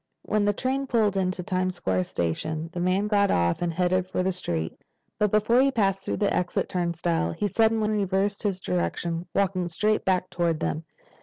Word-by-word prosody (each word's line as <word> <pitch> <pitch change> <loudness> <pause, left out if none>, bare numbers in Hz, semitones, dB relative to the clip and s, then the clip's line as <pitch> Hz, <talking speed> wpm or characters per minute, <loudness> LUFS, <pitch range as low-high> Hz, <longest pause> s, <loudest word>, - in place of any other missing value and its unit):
When 210 -1 +1
the 205 - +4
train 265 +5 -1
pulled 220 -5 +2
into 185 -1 -1
the - - -19
Times 185 0 -1
Square 95 -1 0
station 155 - -3
the 175 - -4
man 185 +3 +1
got 200 -1 +3
off 85 - +1
and 175 -1 0
headed 180 +2 +1
for 185 - -1
the 190 - +1
street. 85 - -4 0.4
But 210 - +3
before 215 +5 +4
he 275 - +4
passed 195 -7 +1
through - - -2
the 205 -2 +1
exit 180 -1 0
turnstile 170 - -1
he 205 - -1
suddenly 220 +1 +2
reversed 200 -1 0
his 200 -4 -1
direction, 165 - -2
walking 185 -3 +1
straight 210 +6 +1
back 185 -1 0
toward 170 -2 0
them. 160 0 -2
185 Hz, 190 wpm, -26 LUFS, 170-205 Hz, 0.4 s, the